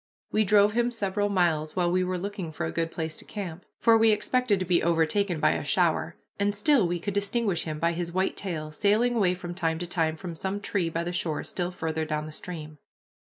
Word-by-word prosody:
We 215 - +3
drove 205 +1 +5
him 240 +2 +1
several 205 -3 -1
miles, 165 -5 +1
while 175 -2 +1
we 185 +1 +2
were 185 0 -1
looking 190 -2 -5
for 145 - -3
a 80 - -3
good 165 - -1
place 160 -1 -4
to - - -8
camp, 185 -4 -6
for 225 -1 +5
we 225 0 +5
expected 220 +1 +2
to 185 - -2
be 175 -1 +2
overtaken 170 +2 +1
by - - +4
a - - -2
shower, - - +1 0.2
and 200 0 +1
still 225 - +4
we 175 0 -2
could 200 +4 -3
distinguish 200 -2 0
him 155 -2 -3
by 170 +2 +1
his 170 0 -3
white 185 +2 0
tail, 155 -6 -4
sailing 210 +8 +2
away 185 -5 +3
from 175 -1 -6
time 165 -3 -1
to 175 - -4
time 165 -2 0
from 175 0 -6
some 190 +5 -3
tree 200 -4 -1
by 165 +1 -2
the 175 +1 -4
shore 160 -3 -1
still 175 -1 -2
farther 160 -3 -3
down 155 -1 -2
the 155 - -8
stream. 155 -2 -7
180 Hz, 230 wpm, -27 LUFS, 165-205 Hz, 0.2 s, drove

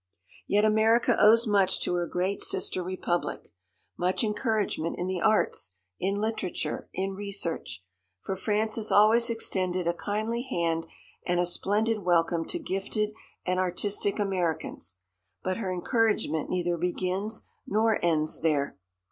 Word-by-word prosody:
Yet 210 +1 +3
America 220 +2 +4
owes 225 +3 +7
much 200 -3 +2
to - - 0
her 175 -1 0
great 185 +4 -1
sister 185 0 +1
republic; 175 -1 -3 0.5
much 180 +6 +1
encouragement 210 -6 -1
in 175 - -2
the 185 -1 -2
arts, 210 - +2 0.2
in 195 +2 0
literature, 210 -3 -3
in 190 +1 -2
research. 195 - -3 0.4
For 190 - -3
France 215 +3 0
has 220 -1 -1
always 225 +3 +6
extended 185 -6 0
a 170 - +2
kindly 215 +6 -2
hand 165 -1 -1 0.4
and 175 -1 0
a 175 - +3
splendid 215 +5 0
welcome 170 -2 +2
to - - -3
gifted 210 - -2 0.3
and 185 0 0
artistic 195 +2 0
Americans. 175 - -2 0.5
But 185 0 -1
her 195 -5 -3
encouragement 210 - 0
neither 175 -1 0
begins 185 +5 -1 0.2
nor 220 +1 +2
ends 155 -2 +1
there. 145 -8 0
190 Hz, 135 wpm, -28 LUFS, 175-215 Hz, 0.5 s, owes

